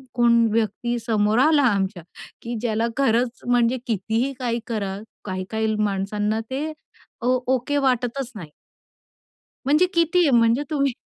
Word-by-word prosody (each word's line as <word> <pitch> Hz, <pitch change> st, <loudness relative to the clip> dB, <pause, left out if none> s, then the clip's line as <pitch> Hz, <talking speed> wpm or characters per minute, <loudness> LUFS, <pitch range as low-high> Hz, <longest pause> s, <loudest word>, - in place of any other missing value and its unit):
कोण 235 Hz, -1 st, +4 dB
व्यक्ती 230 Hz, +2 st, -1 dB
समोर 215 Hz, +1 st, +2 dB
आला 305 Hz, -2 st, +4 dB
आमच्या 195 Hz, -5 st, -1 dB, 0.4 s
की 235 Hz, +1 st, -4 dB
ज्याला 230 Hz, -1 st, 0 dB
खरंच 245 Hz, -2 st, +1 dB
म्हणजे 245 Hz, 0 st, +3 dB
कितीही 225 Hz, +5 st, -1 dB
काही 240 Hz, -2 st, -1 dB
कराल 205 Hz, -3 st, -3 dB, 0.2 s
काही-काही 215 Hz, +3 st, -2 dB
माणसांना 210 Hz, +1 st, -1 dB
ते, 285 Hz, +4 st, -3 dB, 0.5 s
ओ 250 Hz, +2 st, +2 dB, 0.2 s
ओके 260 Hz, +4 st, -2 dB
वाटतच 260 Hz, -1 st, 0 dB
नाही. 170 Hz, -7 st, -8 dB, 1.2 s
म्हणजे 300 Hz, +6 st, +4 dB
कितीही, 335 Hz, -1 st, +3 dB
म्हणजे 235 Hz, +2 st, +4 dB
तुम्ही. 280 Hz, -3 st, +1 dB
235 Hz, 125 wpm, -23 LUFS, 215-260 Hz, 1.2 s, कोण